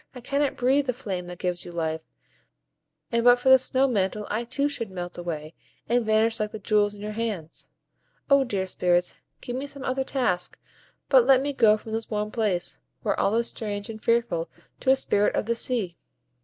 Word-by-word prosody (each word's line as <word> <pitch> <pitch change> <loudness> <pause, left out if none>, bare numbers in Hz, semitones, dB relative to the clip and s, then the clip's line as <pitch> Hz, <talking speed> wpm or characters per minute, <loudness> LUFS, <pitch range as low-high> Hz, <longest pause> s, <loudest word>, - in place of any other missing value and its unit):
I - - -7
cannot 280 +3 -1
breathe 270 +3 +2
the 250 - +1
flames 195 -8 -5
that 180 0 -8
give 180 0 -2
you 175 - -9
life, 160 -1 -2 1.1
and 235 0 +1
but 245 0 +7
for 245 +2 +1
this 260 -1 +7
snow 265 +1 +2
mantle 210 -3 -1
I 225 +3 -1
too 275 +4 0
should 235 -7 -2
melt 180 -2 -6
away, 160 -3 -5 0.3
and 240 +1 +2
vanish 220 +1 +2
like 210 0 -1
the - - -6
jewels 210 0 +1
in 205 - -12
your 210 - -4
hands. 210 -8 -5 0.6
O 280 -1 +5
dear 200 -7 -2
Spirits, 180 -1 0 0.2
give 245 - -5
me 270 +2 -3
some 280 -1 -9
other 265 0 -1
task, 245 -10 -1 0.5
but - - +5
let 265 -1 +7
me 285 +2 -2
go 220 -5 +5
from 220 - -10
this 225 0 -3
warm 210 -1 -2
place, 210 -7 -1 0.2
where - - 0
all 205 - +2
is 235 0 +1
strange 205 -1 -5
and 220 -1 -11
fearful 230 -8 +1 0.3
to 260 - -1
a 265 - +7
Spirit 210 -6 +2
of - - 0
the 235 - +1
sea." 230 -7 -1
220 Hz, 205 wpm, -26 LUFS, 190-250 Hz, 1.1 s, but